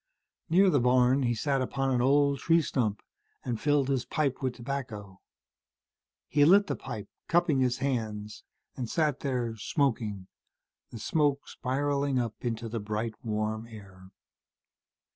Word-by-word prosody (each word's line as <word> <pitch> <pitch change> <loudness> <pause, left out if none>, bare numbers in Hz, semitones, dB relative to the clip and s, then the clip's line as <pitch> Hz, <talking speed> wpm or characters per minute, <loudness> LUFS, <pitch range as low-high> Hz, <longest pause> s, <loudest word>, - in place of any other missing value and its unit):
Near 185 +3 +5
the 145 - +3
barn, 125 +2 +4
he 120 -2 +1
sat 135 +4 0
upon 135 +1 -1
an 125 -2 +2
old 140 +1 +3
tree 165 0 +3
stump 110 -8 -1 0.4
and 120 -3 -3
filled 145 -2 +2
his 135 -3 0
pipe 145 -4 -1
with 130 -2 -1
tobacco. 115 -7 -6 1.1
He 145 -1 +3
lit 195 +7 +6
the - - -2
pipe, 110 -6 -7 0.2
cupping 170 -5 +2
his 125 -1 +1
hands, 110 -6 -3 0.3
and 120 -3 -4
sat 150 -4 +1
there, 125 -5 -2
smoking, 110 - -1 0.6
the - - -9
smoke 145 +4 0
spiraling 140 +1 -1
up 120 -3 -1
into 115 -1 -2
the 115 +1 -3
bright 105 +2 -3
warm 110 0 -2
air. 95 -4 -13
125 Hz, 145 wpm, -29 LUFS, 110-140 Hz, 1.1 s, lit